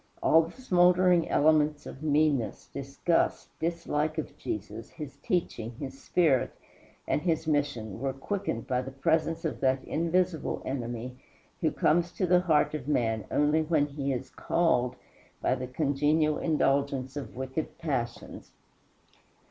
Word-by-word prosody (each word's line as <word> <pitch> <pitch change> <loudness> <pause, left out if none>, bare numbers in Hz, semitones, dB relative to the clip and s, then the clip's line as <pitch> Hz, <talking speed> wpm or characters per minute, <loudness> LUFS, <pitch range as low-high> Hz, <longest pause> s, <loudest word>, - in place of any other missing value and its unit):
All 160 - +6
the 165 +9 -8
smouldering 180 -5 +4
elements 150 0 +3
of 135 - -9
meanness, 150 -4 +1
disgust, 140 +5 0
dislike 160 -2 -1
of 155 - -4
Jesus, 105 +2 -5
his 150 -3 -9
teaching, 125 - -2
his 135 +1 -7
spirit, 155 -8 +2 0.6
and - - +1
his 160 -1 0
mission 140 -9 -1
were 135 +1 -1
quickened 135 - -3
by 125 -1 0
the 130 - -6
presence 160 +5 0
of 160 - -2
that 130 0 +2
invisible 170 +1 0
enemy 125 -1 -4 0.4
who - - +2
comes 175 +1 +2
to 190 - 0
the 180 0 +4
heart 155 -5 +2
of 145 -4 -5
man 110 -7 0
only 150 +2 +3
when 155 -2 +2
he 140 -1 -3
is 125 - -4
called 125 -8 +1 0.4
by - - +1
the 130 0 -3
congenial 150 +3 +1
indulgence 140 -4 +1
of 145 - -6
wicked 130 +4 -4
passions. 125 -7 -4
150 Hz, 140 wpm, -29 LUFS, 130-165 Hz, 0.6 s, All